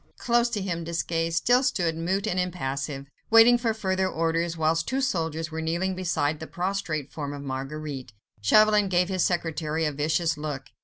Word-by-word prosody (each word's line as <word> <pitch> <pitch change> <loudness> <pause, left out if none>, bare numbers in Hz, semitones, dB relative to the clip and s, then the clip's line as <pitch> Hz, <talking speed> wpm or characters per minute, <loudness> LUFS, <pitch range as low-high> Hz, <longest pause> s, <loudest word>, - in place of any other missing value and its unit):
Close 240 0 +2
to 210 -5 -2
him 170 -3 -3
Desgas 165 0 -1
still 245 +9 +4
stood 175 -11 0
mute 185 +5 -1
and 185 -4 -1
impassive, 140 -6 -3 0.2
waiting 225 +2 +8
for 235 -2 +1
further 190 -3 0
orders, 165 0 -1
whilst 160 +1 +1
two 265 - 0
soldiers 165 - -1
were 160 0 -4
kneeling 170 +4 -1
beside 160 -5 -1
the 160 - -7
prostrate 175 -6 -3
form 145 -2 -5
of 140 0 -7
Marguerite. 135 -1 -5 0.3
Chauvelin 210 - +5
gave 180 0 +2
his 185 -2 +1
secretary 160 -2 -1
a 150 - 0
vicious 155 +3 0
look. 145 -3 -5
165 Hz, 170 wpm, -26 LUFS, 155-190 Hz, 0.3 s, waiting